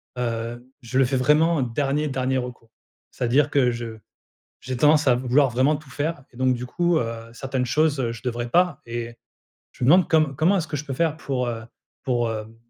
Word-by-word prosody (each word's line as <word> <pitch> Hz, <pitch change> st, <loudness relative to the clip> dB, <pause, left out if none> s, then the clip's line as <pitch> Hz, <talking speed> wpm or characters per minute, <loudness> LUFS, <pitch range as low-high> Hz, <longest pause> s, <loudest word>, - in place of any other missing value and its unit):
hem, 120 Hz, -1 st, -3 dB, 0.2 s
je 120 Hz, +2 st, -3 dB
le 135 Hz, -, +5 dB
fais 130 Hz, +2 st, 0 dB
vraiment 150 Hz, +4 st, +3 dB
dernier, 140 Hz, +5 st, -1 dB
dernier 130 Hz, -1 st, -1 dB
recours. 125 Hz, -2 st, -6 dB, 0.4 s
C'est-à-dire 130 Hz, +4 st, +1 dB
que 135 Hz, -4 st, +3 dB
je 115 Hz, -2 st, -6 dB, 0.6 s
j'ai 130 Hz, -1 st, -4 dB
tendance 150 Hz, +3 st, +4 dB
à 125 Hz, -, +5 dB
vouloir 130 Hz, +3 st, +2 dB
vraiment 130 Hz, +6 st, +2 dB
tout 150 Hz, -1 st, -11 dB
faire 145 Hz, +2 st, -3 dB
et 120 Hz, -, -17 dB
donc 130 Hz, 0 st, +2 dB
du 125 Hz, +1 st, -5 dB
coup, 175 Hz, +6 st, +1 dB
heu, 115 Hz, 0 st, -5 dB
certaines 130 Hz, 0 st, -2 dB
choses 140 Hz, -2 st, +1 dB
je 115 Hz, -, -9 dB
devrais 120 Hz, -1 st, -3 dB
pas 180 Hz, +6 st, +2 dB
et 120 Hz, 0 st, -5 dB, 0.6 s
je -, -, -7 dB
me -, -, +2 dB
demande 180 Hz, +3 st, +6 dB
comme 155 Hz, -4 st, +2 dB
comment 170 Hz, +8 st, +3 dB
est-ce 165 Hz, -4 st, -2 dB
que 145 Hz, 0 st, -3 dB
je 145 Hz, -, -6 dB
peux 140 Hz, -, -4 dB
faire 160 Hz, +3 st, 0 dB
pour, 130 Hz, -5 st, -2 dB
heu, 115 Hz, -2 st, -4 dB, 0.4 s
pour, 120 Hz, -3 st, 0 dB
hem, 110 Hz, 0 st, -6 dB
130 Hz, 205 wpm, -23 LUFS, 120-150 Hz, 0.6 s, demande